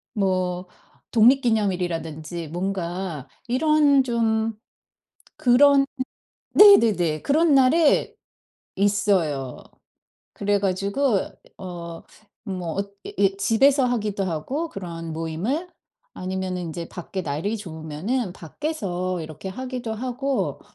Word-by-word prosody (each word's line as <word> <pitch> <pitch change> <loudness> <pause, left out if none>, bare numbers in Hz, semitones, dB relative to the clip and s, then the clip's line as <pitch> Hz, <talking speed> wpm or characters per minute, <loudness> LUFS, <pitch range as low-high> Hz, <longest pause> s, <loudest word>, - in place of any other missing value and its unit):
뭐 185 -2 0 0.4
독립기념일이라든지 180 - +1
뭔가 175 -3 -4 0.2
이런 285 +1 +4
좀 225 -2 0 0.8
그런 275 +2 +5 0.7
네네네, 215 - +6
그런 310 +1 +3
날에 285 +4 +4 0.6
있어요. 190 - +1 0.8
그래 205 0 +1
가지고 200 +5 +1 0.4
어 170 -3 -7 0.5
뭐 180 -4 -4
엇 200 0 -3
이 - - -7
이 195 0 +2
집에서 265 +6 +4
하기도 210 -5 -1
하고 225 - -3
그런 165 -4 -6
모임을. 170 - -2 0.5
아니면은 185 -1 -3
인제 165 0 -6
밖에 185 +1 -5
날이 165 +9 -2
좋으면은 175 - -4
밖에서 185 - -3
이렇게 155 +4 -7
하기도 250 +1 -5
하고 255 +3 -2
195 Hz, 215 characters per minute, -24 LUFS, 175-250 Hz, 0.8 s, 네네네